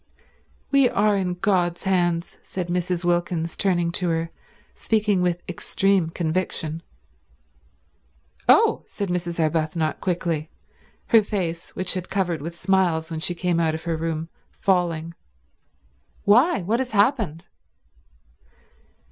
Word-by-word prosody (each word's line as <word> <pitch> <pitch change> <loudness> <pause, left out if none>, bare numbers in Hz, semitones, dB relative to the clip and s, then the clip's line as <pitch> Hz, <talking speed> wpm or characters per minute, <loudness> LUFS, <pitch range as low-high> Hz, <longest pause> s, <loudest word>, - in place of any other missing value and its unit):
"We 275 -3 +5
are 210 0 +2
in 185 -2 -1
God's 175 -2 0
hands," 175 -3 0
said 180 -2 -5
Mrs. 180 0 -1
Wilkins, 175 -1 0
turning 175 -3 +1
to 180 0 0
her, 165 0 -1 0.4
speaking 210 -4 +1
with 175 -1 0
extreme 190 0 +1
conviction. 165 -1 -2 1.7
"Oh!" - - +5
said 200 -2 -4
Mrs. 175 -1 -2
Arbuthnot 155 0 0
quickly, 170 -4 -1 0.6
her 225 -2 +7
face, 180 -5 -3
which 185 -1 -1
had 185 -1 -3
been - - -29
covered 180 -5 0
with 165 +3 -6
smiles 170 -3 +1
when 160 - -3
she 175 +2 -1
came 175 -1 0
out 160 -1 +1
of 160 - -7
her 170 -1 -1
room, 160 0 -3 0.3
falling. 170 -3 +1 1.1
"Why, 245 - +4
what 220 +7 0
has 260 -1 -1
happened?" 205 - +1
175 Hz, 125 wpm, -24 LUFS, 165-195 Hz, 1.7 s, her